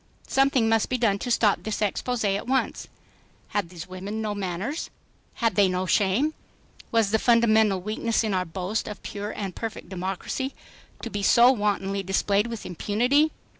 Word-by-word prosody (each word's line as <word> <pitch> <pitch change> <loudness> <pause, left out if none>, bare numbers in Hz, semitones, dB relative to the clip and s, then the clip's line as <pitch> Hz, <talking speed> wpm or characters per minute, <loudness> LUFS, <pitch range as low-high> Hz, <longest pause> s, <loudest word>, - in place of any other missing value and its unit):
Something 270 -4 +3
must 225 -1 +2
be 255 - 0
done 215 -5 +2
to 245 - -4
stop 220 -4 +3
this 215 -1 -3
expose 225 +3 -1
at 200 +2 0
once. 265 +1 0 0.6
Had 205 -5 -1
these 170 -2 -9
women 190 +4 -5
no 215 -1 -2
manners? 200 - -3 0.5
Had 230 -3 +1
they 200 +1 +4
no 185 0 -1
shame? 210 - +2 0.6
Was 225 -3 +2
the 220 - +3
fundamental 220 -4 +4
weakness 215 +4 -1
in 215 -2 -1
our 185 -1 +1
boast 185 +5 -3
of 210 - -8
pure 205 0 -5
and 195 -4 -5
perfect 225 -1 -6
democracy 190 +8 -4 0.5
to 230 - -5
be 205 - -3
so 240 +5 +6
wantonly 200 -4 0
displayed 200 +3 +1
with 230 -2 -6
impunity? 245 - +2
210 Hz, 170 wpm, -25 LUFS, 195-230 Hz, 0.6 s, so